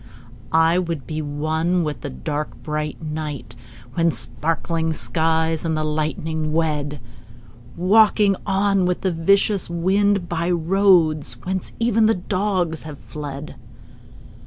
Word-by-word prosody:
I 165 +2 +4
would 165 -7 -3
be 155 +3 -3
one 160 +4 0
with 150 -2 -4
the 145 - -4
dark 140 -4 -5
bright 150 0 -3
night 150 -7 -5 0.4
When 170 +2 +2
sparkling 165 +1 -1
skies 160 0 0
and 160 -2 0
the 155 - -1
lightning 155 +1 -2
wed— 150 -3 -1 0.8
Walking 205 +2 +4
on 195 -1 +2
with 180 - -1
the 190 - +1
vicious 195 +4 +2
wind 190 +2 +1
By 170 0 -1
roads 170 - +3
whence 185 0 -3
even 225 -1 +3
the 225 - +3
dogs 185 -3 -1
have 150 -2 -8
fled. 145 -1 -8
165 Hz, 125 wpm, -22 LUFS, 155-185 Hz, 0.8 s, I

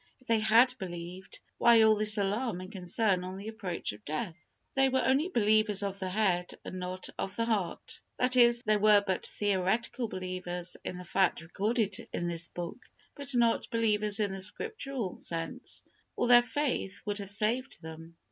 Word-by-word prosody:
If 255 - -24
they 230 -2 +2
had 230 +4 +5
believed, 180 0 -8 0.2
why 235 -1 +6
all 220 0 +6
this 210 +1 +6
alarm 205 +1 -1
and 185 +1 -9
concern 185 0 0
on 185 +1 -6
the 200 +2 -8
approach 195 -6 -4
of 105 0 -14
death? 160 +4 -3 0.4
They 270 0 +3
were 260 -2 +1
only 275 +8 +2
believers 215 - +3
of 200 0 -4
the 190 -1 -3
head, 185 -3 0
and 185 - -6
not 185 +1 -5
of 195 - -3
the 230 - 0
heart; 205 -7 -2 0.2
that 250 0 +2
is, 240 -1 +5
they 215 0 +2
were 205 0 +5
but 190 -2 0
theoretical 205 +4 0
believers 185 -2 -4
in 180 - -5
the 180 - -9
facts 185 -1 +1
recorded 205 +3 -1
in 175 - -2
this 170 -1 -1
book, 175 +9 -7 0.3
but 280 -2 -4
not 235 -1 +2
believers 215 -2 +2
in 205 -2 0
the 195 0 -5
Scriptural 270 - -2
sense, 165 -1 -3 0.3
or - - 0
their 240 0 +8
faith 245 -6 -2
would 205 -1 -2
have 200 -1 -6
saved 230 +6 0
them. 160 +1 -10
205 Hz, 180 wpm, -30 LUFS, 185-230 Hz, 0.4 s, their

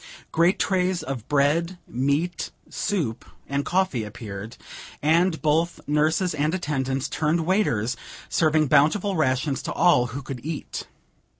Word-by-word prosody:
Great 170 +3 +3
trays 185 -2 +1
of 135 -7 -5
bread, 150 +5 +2
meat, 140 +8 -1 0.2
soup 145 - -2 0.2
and 140 +1 -1
coffee 180 -10 +1
appeared; 105 0 -8 0.4
and 165 +3 +3
both 160 +3 +1
nurses 155 +5 +2
and 150 +3 0
attendants 135 -5 -1
turned 160 +2 0
waiters, 125 - +1 0.3
serving 155 -1 +3
bountiful 155 +8 +3
rations 135 -2 +1
to - - -4
all 125 -9 +4
who 130 +4 -6
could 130 -3 -7
eat. 155 0 -5
150 Hz, 125 wpm, -24 LUFS, 135-170 Hz, 0.4 s, all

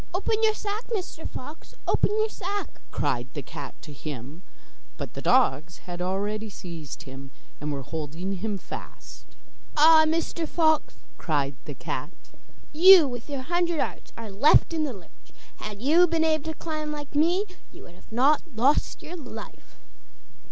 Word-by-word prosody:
'Open 435 +3 0
your 435 -1 +4
sack, 425 +2 -4
Mr 370 -7 -4
Fox, 295 +5 -9
open - - +3
your 435 +1 +2
sack,' 405 -1 -5
cried 120 +1 -1
the 145 - -4
cat 145 +1 -8
to 150 - -9
him, 145 +2 -7 0.6
but - - -6
the - - -6
dogs 170 - +2
had 175 0 -6
already 205 +4 -2
seized 170 -6 -8
him, 135 -2 -10 0.3
and 150 +1 -3
were 140 -2 -4
holding 160 +6 -4
him 205 +2 -2
fast. - - -10 0.5
'Ah, 315 +1 +8
Mr 330 0 -1
Fox,' 315 -2 +2 0.2
cried 145 -4 0
the 145 - -6
cat. - - -4 0.6
'You 350 0 +9
with 245 +1 -6
your 275 -2 -3
hundred 345 +1 0
arts - - -3
are 225 -3 -7
left 280 - +5
in 315 -1 +1
the 275 - -3
lurch! 185 -6 -17 0.2
Had 210 +1 -7
you 335 +6 +6
been 330 -1 +1
able 315 -1 +1
to 320 0 -3
climb 310 -2 -4
like 295 -1 -6
me, 345 +7 +3 0.3
you - - -13
would 175 - -15
not 270 +6 +4
have 325 -8 -23
lost 270 +6 +2
your 345 - -7
life. 245 -10 -10
265 Hz, 165 wpm, -26 LUFS, -, 0.6 s, You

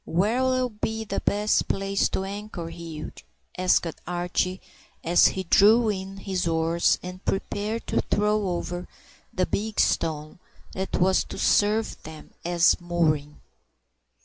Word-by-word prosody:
"Where'll 250 +8 +1
be 220 0 -3
the 220 - -3
best 210 +1 +1
place 195 0 0
to 190 - -2
anchor, 195 -3 -6
Hugh?" 165 -3 -7 0.4
asked 185 -1 +2 0.2
Archie, 180 +1 -1 0.4
as 170 +1 +5
he 190 - -2
drew 215 +6 +5
in 195 -1 -4
his 190 -3 -2
oars, 165 +1 +2
and 180 +1 -8
prepared 210 +3 -2
to - - 0
throw 210 0 +1
over 175 0 -3 0.4
the 185 - 0
big 215 +3 -3
stone 155 0 0 0.3
that 190 0 -3
was 190 +1 +3
to - - -8
serve 215 +2 +2
them 155 -1 -11
as 170 -1 +4
a - - -18
mooring. 155 -4 0
190 Hz, 135 wpm, -25 LUFS, 170-210 Hz, 0.4 s, as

